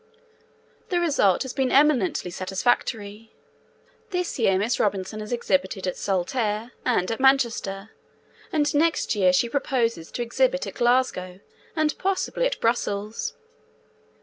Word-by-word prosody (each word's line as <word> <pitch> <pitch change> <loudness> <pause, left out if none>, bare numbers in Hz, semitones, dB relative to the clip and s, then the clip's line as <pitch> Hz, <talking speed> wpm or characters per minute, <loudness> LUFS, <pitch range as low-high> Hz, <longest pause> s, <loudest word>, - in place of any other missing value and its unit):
The 355 - +1
result 280 - +2
has 265 - -6
been 265 -2 0
eminently 265 -11 +3
satisfactory. 205 +3 -2 0.7
This 360 -6 -2
year 195 -5 +3
Miss 215 +5 0
Robinson 200 +1 -1
has 210 +1 -7
exhibited 240 -5 0
at 180 - -2
Saltaire 210 +4 -1
and 230 -5 +1
at 225 - -3
Manchester, 235 -7 +1 0.6
and 295 -2 +1
next 320 +2 +2
year 190 -4 +4
she 185 +6 +2
proposes 230 - -1
to 240 - -2
exhibit - - +1
at - - -6
Glasgow, 240 -7 +1 0.4
and, 310 -2 +1
possibly, 390 +6 0
at - - -4
Brussels. 215 -2 -1
235 Hz, 125 wpm, -24 LUFS, 200-275 Hz, 0.7 s, year